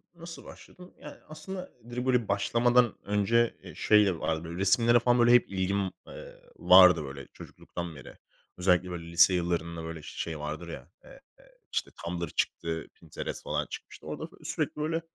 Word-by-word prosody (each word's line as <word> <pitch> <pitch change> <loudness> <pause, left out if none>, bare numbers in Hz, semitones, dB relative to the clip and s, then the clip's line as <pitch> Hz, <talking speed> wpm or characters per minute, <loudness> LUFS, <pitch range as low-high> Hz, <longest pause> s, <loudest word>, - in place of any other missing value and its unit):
Nasıl 170 0 -10
başladım? 180 0 -14
Yani - - -11
aslında 185 +4 -8 0.2
direkt 125 +1 -4
böyle 125 -4 +2
başlamadan 120 +4 +2
önce, 105 +3 +1
eee, - - -11
şeyle 105 -5 +3
vardı 80 0 -2
böyle 85 +1 -7
resimlere 115 +4 +4
falan 120 +1 +2
böyle 120 0 +5
hep 125 - +4
ilgim, 95 0 -1 0.2
eee, - - -11 0.2
vardı 90 -2 +7
böyle 70 0 -8
çocukluktan 85 -2 -8
beri. 65 - -12 0.4
Özellikle, 90 0 +2
böyle, 85 -1 -7
lise 85 +2 +6
yıllarında, 85 -1 -1
işte, - - -8
böyle 80 -1 -7
şey 80 +1 -6
vardır 75 +3 -5
ya 70 -3 -9 1.2
Tumblr 85 0 -3
çıktı, 80 +2 -2
Pinterest - - -7
falan - - -2
çıkmıştı. - - -10
Orada - - -5
f - - -20
sürekli, - - -2
böyle, 160 +2 -1
95 Hz, 160 wpm, -28 LUFS, 85-120 Hz, 1.2 s, vardı